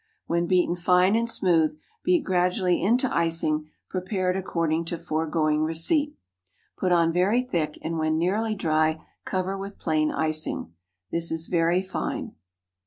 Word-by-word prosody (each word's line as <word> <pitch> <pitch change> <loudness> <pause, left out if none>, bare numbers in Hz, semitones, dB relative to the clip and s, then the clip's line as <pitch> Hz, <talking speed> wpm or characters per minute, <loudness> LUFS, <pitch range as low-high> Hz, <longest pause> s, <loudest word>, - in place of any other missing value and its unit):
When 170 +1 0
beaten 180 -1 +2
fine 180 +3 +3
and 230 +1 +1
smooth, 165 -7 +2 0.3
beat 355 -3 +3
gradually 180 0 +1
into 240 +8 +2
icing, 160 -2 0 0.2
prepared 185 0 -1
according 165 -3 -1
to 170 +1 -3
foregoing 155 -2 0
receipt. 165 - +1 0.6
Put 185 - -1
on 170 -1 +3
very 200 +8 +2
thick, 165 -11 -2
and, 165 0 -2
when 155 0 +1
nearly 210 +6 0
dry, 155 -3 0 0.2
cover 190 0 -2
with 195 +1 -7
plain 155 -1 0
icing. 155 - -2 0.4
This 170 0 -1
is 160 0 -2
very 170 +1 +2
fine. 185 - -4
170 Hz, 140 wpm, -25 LUFS, 160-190 Hz, 0.6 s, fine